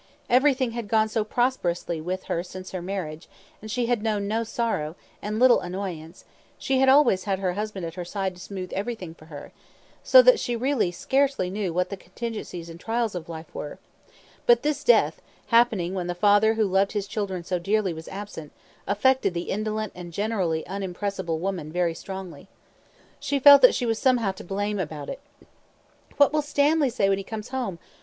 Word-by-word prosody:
Everything 260 -1 +3
had 235 -2 -5
gone 220 0 +3
so 220 0 -1
prosperously 185 -9 -1
with 185 +3 -4
her 170 - -2
since 185 +1 -9
her 185 - -4
marriage; 175 -4 -5 0.4
she 235 +2 -1
had 240 -2 0
known 210 -2 -1
no 225 +2 0
sorrow, 220 -9 -2 0.3
and 210 +1 -3
little 250 +1 +6
annoyance; 180 -2 -6 0.3
she 265 -1 0
had 265 0 +5
always 265 -9 +5
had 195 -2 0
her 185 -2 -1
husband 205 -2 -4
at 165 - -6
her 180 0 -5
side 190 +1 -3
to 180 - -14
smooth 185 -2 -7
everything 195 -5 -4
for 155 - -17
her, 145 -3 -10 0.5
so - - +7
that - - +6
she 240 - -2
really 250 -4 +1
scarcely 265 +1 0
knew 200 -2 -2
what 180 +2 0
the 200 - -4
contingencies 185 -3 -6
and 165 0 -10
trials 225 +1 -1
of 170 -2 -6
life 160 -1 -8
were; 145 - -6 0.7
but 240 0 +5
this 300 0 -1
death, - - +4 0.3
happening 225 -7 +3
when 180 -2 -3
the 175 - -3
father 205 +3 +4
who 220 -1 +2
loved 195 +1 +1
his 205 -2 -1
children 200 -3 -4
so 180 +1 -2
dearly 195 0 0
was 160 0 -9
absent, 195 -6 -8 0.4
affected 230 -1 +2
the 170 - -3
indolent 215 0 -2
and 175 -1 -9
generally 190 -6 -1
unimpressible 190 -2 -3
woman 175 -3 -4
very 175 0 0
strongly. 185 -3 -8 0.7
She 285 - -1
felt 280 +1 +9
that 250 - +7
she 245 - -1
was 225 -1 0
somehow 245 -7 +2
to 190 - -11
blame 205 +2 -2
about 155 -4 -5
it. 275 - -6 1.0
"What 285 0 +5
will 305 - +2
Stanley 295 0 +2
say 210 -4 +1
when 195 0 +2
he - - -5
comes 215 +2 -7
home? 250 -9 -3
200 Hz, 190 wpm, -25 LUFS, 180-235 Hz, 1.0 s, felt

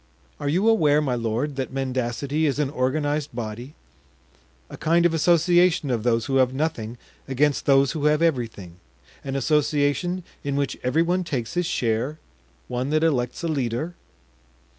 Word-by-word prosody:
"Are 145 -1 -2
you 185 +8 +2
aware, 155 -10 +4
my 140 -4 0
lord, 120 +5 -2
that 130 - -3
mendacity 135 +3 -1
is 140 - 0
an 145 -2 0
organized 145 +1 -1
body, 120 +4 -6 0.9
a - - -9
kind 170 +2 +2
of 170 - +3
association 175 -1 +3
of 120 -3 0
those 115 -1 +1
who 135 - 0
have 130 0 +2
nothing 125 -6 -2 0.3
against 140 +2 +1
those 135 -1 +4
who 150 -2 -3
have 150 0 +4
everything; 115 - -1 0.5
an 135 -1 -4
association 150 +5 +1 0.2
in 140 -1 -2
which 140 -1 -1
every 140 +6 +2
one 180 +2 0
takes 125 -9 -3
his 175 -1 0
share; 125 0 -1 0.5
one 125 +2 -2
that 155 +1 +1
elects 130 -3 0
a - - 0
leader?" 140 +2 -2
140 Hz, 160 wpm, -24 LUFS, 125-155 Hz, 0.9 s, aware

